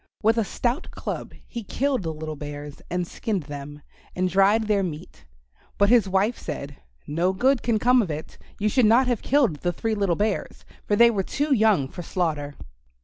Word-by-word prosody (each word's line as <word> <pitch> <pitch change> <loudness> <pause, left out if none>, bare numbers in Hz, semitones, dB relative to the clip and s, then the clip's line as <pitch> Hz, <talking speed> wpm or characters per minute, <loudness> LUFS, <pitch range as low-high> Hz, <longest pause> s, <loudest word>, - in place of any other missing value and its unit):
With 225 +2 +4
a - - +2
stout 245 - -2
club - - -6
he 235 - -6
killed 265 +4 -1
the 165 -3 -3
little 155 0 -6
bears 145 0 -8
and 180 0 -1
skinned 200 0 -3
them 145 0 -8 0.3
and 185 +1 +1
dried 200 +3 +4
their 210 -2 +2
meat. 160 -5 -6 0.5
But 200 0 +4
his 230 -6 +5
wife 195 +5 +1
said, 140 0 -6 0.3
"No 170 +5 0
good 260 +6 +2
can 230 -2 +1
come 250 +3 +4
of 195 - -3
it. 155 0 -6 0.2
You 210 - 0
should 240 +1 +4
not 235 +4 +5
have 245 -3 0
killed 265 - +2
the 175 +4 -1
three 220 +5 -2
little 200 -5 +1
bears, 210 +1 -2 0.2
for 205 - +2
they 235 +2 +6
were 205 -4 0
too 285 +9 0
young 215 - +3
for 175 - -8
slaughter." 155 -5 -2
200 Hz, 195 wpm, -24 LUFS, 160-230 Hz, 0.5 s, they